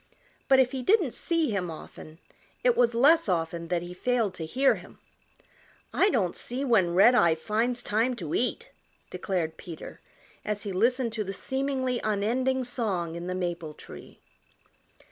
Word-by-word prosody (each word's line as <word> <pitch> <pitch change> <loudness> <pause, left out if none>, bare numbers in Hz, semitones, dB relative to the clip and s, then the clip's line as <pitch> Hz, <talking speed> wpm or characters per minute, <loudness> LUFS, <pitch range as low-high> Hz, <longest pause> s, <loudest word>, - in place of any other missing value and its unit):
But 265 - +6
if 255 -1 +3
he 265 -2 -4
didn't 370 - +2
see 330 -6 0
him 185 -4 -2
often 155 0 -10 0.5
it - - +4
was 235 -1 +3
less 295 +2 +5
often 170 -1 -1
that 175 0 -1
he 175 0 -8
failed 230 0 0
to 165 -3 -6
hear 265 +9 +3
him. - - -11 1.0
"I 395 - +4
don't 200 - 0
see 255 +3 -3
when 190 -9 +3
Redeye 195 -4 +6
finds 230 +8 -1
time 230 +4 +1
to 165 -9 -6
eat," 460 - -1 0.4
declared 170 -5 -2
Peter 170 -3 -10 0.4
as 210 -1 -3
he 205 - -4
listened 235 +4 +1
to 220 -2 -2
the 195 -1 -5
seemingly 265 +2 -2
unending 245 +5 0
song 205 -9 -2
in 170 +1 -6
the 185 - -2
maple 170 -4 -4
tree. - - -12
220 Hz, 160 wpm, -27 LUFS, 175-255 Hz, 1.0 s, But